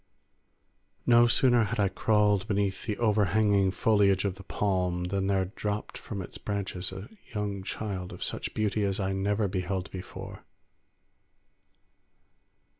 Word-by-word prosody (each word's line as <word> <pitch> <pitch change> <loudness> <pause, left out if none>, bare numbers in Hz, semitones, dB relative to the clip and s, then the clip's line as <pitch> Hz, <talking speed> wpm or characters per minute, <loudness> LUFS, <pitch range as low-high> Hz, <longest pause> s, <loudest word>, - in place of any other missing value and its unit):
No 120 0 +6
sooner 120 -1 +4
had 115 +1 -3
I 100 - +4
crawled 105 0 +2
beneath 100 -1 -1
the 105 - -1
overhanging 105 -2 +3
foliage 100 0 +3
of 100 - 0
the 100 +1 -12
palm, 90 -3 0
than 95 +2 -1
there 95 -1 +2
dropped 105 +2 -4
from 100 -4 -6
its - - -8
branches 95 -3 -3
a 95 +3 -7 0.3
young 100 -2 -2
child 95 -2 -4
of - - -6
such - - -3
beauty 105 -1 0
as 100 0 0
I 95 -1 0
never 100 +2 +1
beheld 95 0 -3
before. 95 -1 -8
100 Hz, 135 wpm, -28 LUFS, 95-105 Hz, 0.3 s, No